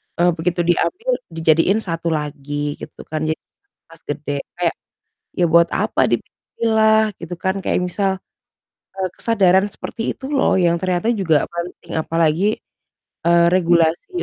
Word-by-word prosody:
eee, 175 Hz, +1 st, +3 dB
begitu 170 Hz, +1 st, -1 dB
diambil 365 Hz, -, 0 dB, 0.2 s
dijadiin 165 Hz, +5 st, +3 dB
satu 170 Hz, -1 st, -3 dB
lagi 145 Hz, -1 st, -3 dB
gitu -, -, -10 dB
kan, 155 Hz, -, -4 dB
jadinya 155 Hz, -, -5 dB, 0.3 s
tas 165 Hz, 0 st, -17 dB
gede 145 Hz, -1 st, -3 dB, 0.2 s
kayak, -, -, +1 dB, 0.6 s
ya 180 Hz, -, +1 dB
buat 170 Hz, 0 st, +5 dB
apa -, -, +1 dB
dipilah 220 Hz, -1 st, +1 dB
gitu 175 Hz, +1 st, -6 dB
kan. 190 Hz, +3 st, -2 dB
Kayak 185 Hz, -, 0 dB
misal, 195 Hz, +1 st, +1 dB, 0.8 s
eee, 190 Hz, -1 st, -2 dB
kesadaran 190 Hz, -3 st, +3 dB
seperti 225 Hz, +2 st, -5 dB
itu 270 Hz, +2 st, -7 dB
loh 275 Hz, -2 st, +2 dB
yang 170 Hz, -2 st, +2 dB
ternyata 185 Hz, +5 st, 0 dB
juga 180 Hz, -9 st, +2 dB
penting, 170 Hz, -1 st, -5 dB
apalagi, 165 Hz, +6 st, +1 dB, 0.7 s
eee, 170 Hz, 0 st, +5 dB
regulasi 175 Hz, -, +2 dB
175 Hz, 135 wpm, -20 LUFS, 165-200 Hz, 0.8 s, buat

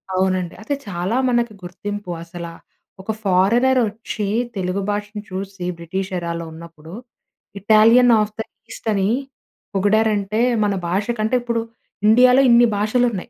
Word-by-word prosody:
అవునండి. 185 Hz, -2 st, 0 dB
అది 285 Hz, -, -1 dB
చాలా 180 Hz, +3 st, -2 dB
మనకి 240 Hz, -2 st, 0 dB
గుర్తింపు 205 Hz, +2 st, -6 dB
అసలా, 170 Hz, -1 st, -8 dB, 0.5 s
ఒక 195 Hz, -, -3 dB
ఫారినర్ 230 Hz, +8 st, +3 dB
వచ్చి 215 Hz, -1 st, -5 dB, 0.3 s
తెలుగు 185 Hz, +1 st, -2 dB
భాషను 210 Hz, 0 st, -3 dB
చూసి 190 Hz, 0 st, -6 dB
బ్రిటిష్ 185 Hz, +3 st, -4 dB
ఎరాలో 170 Hz, -1 st, -4 dB
ఉన్నప్పుడు 165 Hz, 0 st, -12 dB, 0.7 s
ఇటాలియన్ 225 Hz, +4 st, +5 dB
అఫ్ 210 Hz, 0 st, -1 dB
ద -, -, +1 dB, 0.3 s
ఈస్ట్ -, -, -10 dB
అని 195 Hz, 0 st, +1 dB, 0.6 s
పొగిడారంటే 210 Hz, +1 st, +1 dB, 0.2 s
మన 205 Hz, -1 st, +1 dB
భాష 190 Hz, +4 st, 0 dB
కంటే 220 Hz, +4 st, +1 dB
ఇప్పుడు 235 Hz, -1 st, -1 dB, 0.5 s
ఇండియాలో 250 Hz, +4 st, +6 dB
ఇన్ని 235 Hz, 0 st, +6 dB
భాషలున్నాయి. 225 Hz, 0 st, 0 dB
205 Hz, 125 wpm, -20 LUFS, 185-225 Hz, 0.7 s, ఇండియాలో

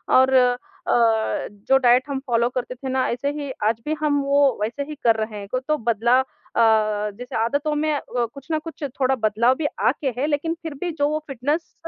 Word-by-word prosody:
और 260 Hz, +1 st, +5 dB
अ, 250 Hz, -1 st, +4 dB, 1.1 s
जो 270 Hz, -, +6 dB
डाइट 250 Hz, -1 st, +4 dB
हम 275 Hz, -1 st, -2 dB
फ़ॉलो 235 Hz, -1 st, +2 dB
करते 250 Hz, 0 st, -4 dB
थे 265 Hz, +1 st, -6 dB
ना 260 Hz, 0 st, +1 dB
ऐसे 245 Hz, +4 st, -1 dB
ही 290 Hz, -2 st, -5 dB
आज 220 Hz, +1 st, +1 dB
भी 305 Hz, -, 0 dB
हम 290 Hz, -2 st, +2 dB
वो 280 Hz, -2 st, +3 dB
वैसे 230 Hz, +7 st, -2 dB
ही 300 Hz, +2 st, -7 dB
कर 230 Hz, -1 st, +5 dB
रहे 215 Hz, -1 st, -4 dB
हैं 200 Hz, -, -8 dB, 0.2 s
तो 305 Hz, 0 st, +2 dB
बदलाव 235 Hz, +2 st, +2 dB, 0.3 s
अ, -, -, +3 dB, 0.6 s
जैसे 250 Hz, +2 st, -8 dB
आदतों 285 Hz, +7 st, 0 dB
में 305 Hz, +1 st, +1 dB, 0.2 s
वो 240 Hz, -1 st, +2 dB
कुछ 275 Hz, -1 st, -12 dB
न 315 Hz, -, +1 dB
कुछ 330 Hz, -1 st, -8 dB, 0.2 s
थोड़ा 265 Hz, 0 st, +3 dB
बदलाव 225 Hz, +4 st, +3 dB
भी 315 Hz, -, -3 dB, 0.2 s
आके 275 Hz, +3 st, 0 dB
हैं 275 Hz, +4 st, 0 dB
लेकिन 305 Hz, +2 st, 0 dB
फ़िर 320 Hz, -2 st, -5 dB
भी 350 Hz, +2 st, -2 dB
जो 285 Hz, -, +3 dB
वो 305 Hz, +1 st, -1 dB
फ़िटनेस 285 Hz, +5 st, -2 dB
265 Hz, 205 wpm, -23 LUFS, 240-290 Hz, 1.1 s, जो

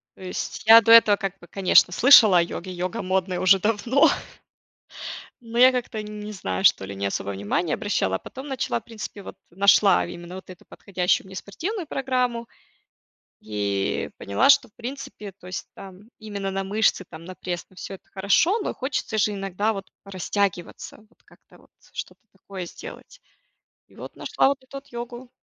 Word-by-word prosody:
То -, -, -18 dB
есть 185 Hz, -1 st, -5 dB
я 225 Hz, +1 st, +11 dB
до 225 Hz, -, +2 dB
этого 225 Hz, -3 st, +8 dB
как 195 Hz, -2 st, -5 dB
бы, 175 Hz, -, -15 dB
конечно, 185 Hz, -1 st, +4 dB
слышала 220 Hz, -3 st, +7 dB
о -, -, +6 dB
йоге, 175 Hz, +2 st, -5 dB
йога 185 Hz, +5 st, -4 dB
модная 185 Hz, -1 st, -1 dB
уже 185 Hz, +1 st, +5 dB
давно. 225 Hz, +7 st, +3 dB, 1.3 s
Но 230 Hz, 0 st, -7 dB
я 255 Hz, +1 st, +8 dB
как-то, 245 Hz, -3 st, -3 dB
не 210 Hz, 0 st, -8 dB
знаю 95 Hz, -, -4 dB
что 95 Hz, -, +4 dB
ли, 100 Hz, +1 st, -8 dB
не 100 Hz, 0 st, -3 dB
особо 100 Hz, 0 st, -3 dB
внимания 100 Hz, -, -2 dB
обращала, 140 Hz, -, -1 dB
а -, -, -3 dB
потом 265 Hz, +2 st, -10 dB
начала, 255 Hz, -, -2 dB
в -, -, -28 dB
принципе, 215 Hz, -3 st, -8 dB
вот -, -, -10 dB
нашла 195 Hz, +1 st, +4 dB
именно 175 Hz, +1 st, -9 dB
вот 190 Hz, -, -11 dB
эту 180 Hz, -1 st, -13 dB
подходящую 185 Hz, -1 st, -1 dB
мне 190 Hz, -, -11 dB
спортивную 340 Hz, -, -5 dB
программу 250 Hz, -4 st, -1 dB, 0.9 s
и 100 Hz, -2 st, -2 dB
поняла, 100 Hz, +1 st, +1 dB
что, 260 Hz, -3 st, +4 dB
в 210 Hz, -, -36 dB
принципе, 235 Hz, -5 st, -8 dB
то 185 Hz, -1 st, -17 dB
есть 180 Hz, -1 st, -6 dB
там 195 Hz, +2 st, -13 dB
именно 200 Hz, -3 st, -5 dB
на 195 Hz, 0 st, -3 dB
мышцы, 200 Hz, -1 st, +1 dB
там, 160 Hz, 0 st, -11 dB
на 185 Hz, +2 st, -9 dB
пресс, 175 Hz, -1 st, -5 dB
на 185 Hz, -, -22 dB
всё- 195 Hz, -, -7 dB
это 190 Hz, -, -15 dB
хорошо, 200 Hz, -, +2 dB
но -, -, -3 dB
хочется 255 Hz, -4 st, -3 dB
же 210 Hz, 0 st, +2 dB
иногда 195 Hz, +2 st, -2 dB
вот 195 Hz, -2 st, -8 dB
порастягиваться, 195 Hz, -1 st, -3 dB
вот 220 Hz, +2 st, -25 dB
как-то -, -, -22 dB
вот -, -, -23 dB, 0.2 s
что-то -, -, -7 dB
такое 190 Hz, -1 st, -8 dB
сделать. -, -, -11 dB, 0.7 s
И -, -, -23 dB
вот -, -, -10 dB
нашла -, -, +1 dB
вот 275 Hz, -1 st, -2 dB
эту 260 Hz, -, -11 dB
вот 275 Hz, +1 st, -10 dB
йогу. 240 Hz, +1 st, -8 dB
200 Hz, 180 wpm, -24 LUFS, 180-230 Hz, 1.3 s, я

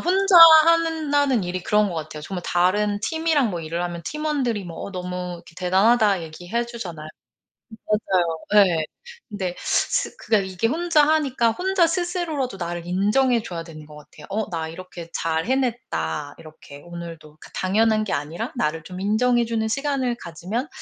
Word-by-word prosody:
혼자 385 Hz, +2 st, +3 dB, 0.3 s
하는 325 Hz, -2 st, +2 dB
나는 285 Hz, -6 st, +2 dB
일이 180 Hz, 0 st, -4 dB
그런 210 Hz, +3 st, +2 dB
것 180 Hz, -, -5 dB
같아요. 155 Hz, -1 st, -6 dB
정말 180 Hz, +2 st, -5 dB
다른 205 Hz, +4 st, +1 dB
팀이랑 320 Hz, -2 st, +1 dB
뭐 175 Hz, -3 st, -4 dB
일을 165 Hz, +2 st, -4 dB
하면 175 Hz, -1 st, -5 dB
팀원들이 280 Hz, -9 st, -2 dB
뭐 170 Hz, -2 st, -9 dB
"어 -, -, -8 dB
너무 180 Hz, 0 st, -5 dB
이렇게 170 Hz, -, -16 dB
대단하다." 195 Hz, +1 st, +3 dB
얘기해 175 Hz, +9 st, -4 dB
주잖아요. 175 Hz, -10 st, -7 dB, 0.8 s
맞아요. 185 Hz, -6 st, 0 dB, 0.3 s
예. 165 Hz, -3 st, 0 dB, 0.4 s
근데 190 Hz, -4 st, -4 dB
스 -, -, 0 dB
그게 215 Hz, -, +1 dB
이게 190 Hz, +3 st, -2 dB
혼자 320 Hz, 0 st, +2 dB
하니까 275 Hz, -7 st, +2 dB
혼자 370 Hz, -, +2 dB
스스로라도 330 Hz, -, -2 dB
나를 175 Hz, -1 st, -5 dB
인정해 215 Hz, +7 st, +2 dB
줘야 175 Hz, -6 st, -6 dB
되는 155 Hz, -2 st, -11 dB
것 150 Hz, 0 st, -14 dB
같아요. 150 Hz, -, -14 dB
'어 215 Hz, +2 st, -2 dB
나 165 Hz, -2 st, -3 dB
이렇게 170 Hz, 0 st, -10 dB
잘 160 Hz, 0 st, -1 dB
해냈다.' 220 Hz, -, -2 dB
이렇게 155 Hz, -3 st, -13 dB
오늘도 165 Hz, -3 st, -10 dB
그 -, -, -14 dB
당연한 215 Hz, +3 st, +1 dB
게 210 Hz, -, -4 dB
아니라 150 Hz, +4 st, -3 dB
나를 155 Hz, +2 st, -1 dB
좀 180 Hz, 0 st, -8 dB
인정해 240 Hz, +4 st, +2 dB
주는 225 Hz, -1 st, -1 dB
시간을 265 Hz, 0 st, -1 dB
가지면 185 Hz, -, -5 dB
200 Hz, 350 characters per minute, -23 LUFS, 170-255 Hz, 0.8 s, 혼자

